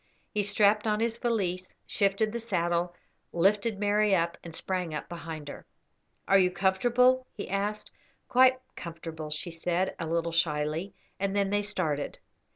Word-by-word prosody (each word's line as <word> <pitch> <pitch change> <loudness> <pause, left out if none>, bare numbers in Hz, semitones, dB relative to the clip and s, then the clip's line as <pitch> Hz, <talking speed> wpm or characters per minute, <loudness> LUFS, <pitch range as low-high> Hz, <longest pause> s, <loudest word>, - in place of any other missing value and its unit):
He 210 - +1
strapped 205 +1 +3
on 210 0 +1
his 230 0 0
valise, 185 -7 -1
shifted 205 +1 +1
his 235 -1 -4
saddle, 175 -3 0 0.4
lifted 200 +5 +2
Mary 205 0 +3
up, 170 -1 0
and 165 -1 -8
sprang 180 -4 -2
up - - -5
behind 160 -3 -7
her. - - -8 0.6
"Are 195 - +6
you 180 -1 +4
comfortable?" 245 +8 +3
he 205 - -7
asked. 205 +2 -2 0.4
"Quite 255 +1 +5 0.2
comfortable," 160 -2 -7
she 150 +3 -4
said, 175 +3 -1
a 165 - -3
little 170 +1 0
shyly, 160 +2 0 0.2
and 195 0 -1
then 200 -1 +1
they 205 0 +2
started. 165 -8 -2
190 Hz, 155 wpm, -29 LUFS, 170-210 Hz, 0.6 s, Are